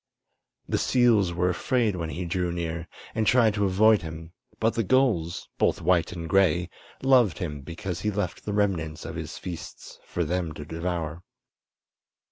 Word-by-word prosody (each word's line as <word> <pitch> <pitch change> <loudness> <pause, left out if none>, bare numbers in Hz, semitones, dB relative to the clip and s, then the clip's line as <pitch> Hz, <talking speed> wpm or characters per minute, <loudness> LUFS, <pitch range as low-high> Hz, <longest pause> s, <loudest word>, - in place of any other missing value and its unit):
The - - 0
seals 115 -7 +3
were 90 +1 +1
afraid 115 +2 +1
when 85 -3 -3
he 90 +2 -4
drew 90 0 -1
near, 85 -1 -3 0.3
and 110 -1 0
tried 115 -4 +5
to 105 -1 +1
avoid 105 +2 +4
him; 80 +1 -8 0.3
but 115 +1 +2
the 115 - 0
gulls, 110 -9 +1
both - - +2
white 90 0 +2
and 85 -2 -6
gray, 90 -1 +3 0.3
loved 125 - +4
him 75 -5 -4
because 85 +4 -5
he 105 - 0
left 100 -4 -3
the 105 - -3
remnants 85 -6 -1
of 80 - -5
his 80 -2 -6
feasts 85 -3 -8
for 85 - -2
them 85 0 -2
to 75 - -8
devour. 85 0 -3
90 Hz, 165 wpm, -26 LUFS, 85-105 Hz, 0.3 s, tried